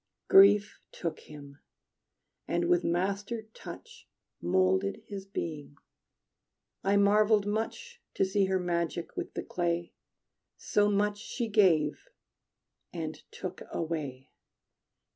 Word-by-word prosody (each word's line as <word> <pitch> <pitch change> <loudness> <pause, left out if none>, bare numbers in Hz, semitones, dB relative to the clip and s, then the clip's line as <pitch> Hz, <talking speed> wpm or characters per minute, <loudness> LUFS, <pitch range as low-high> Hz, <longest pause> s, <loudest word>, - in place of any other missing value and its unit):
Grief 205 +2 +6
took 165 -3 -4
him, 145 -1 -12 0.9
and 170 0 0
with 175 0 +3
master 200 +6 -1
touch - - -11 0.3
Molded 95 +2 +1
his 195 -1 -7
being. 150 -7 -5 1.1
I 200 +1 +3
marveled 205 +1 +4
much 470 - -3
To - - +3
see 195 +1 +2
her 190 0 +1
magic 170 -1 -2
with - - -5
the - - -3
clay, 170 -1 -2 0.6
So 205 0 +2
much 205 0 +1
she 235 +2 -4
gave 185 - +3 0.8
and 160 -2 -5
took 185 -1 -7
away. 150 -6 -4
185 Hz, 105 wpm, -30 LUFS, 160-205 Hz, 1.1 s, Grief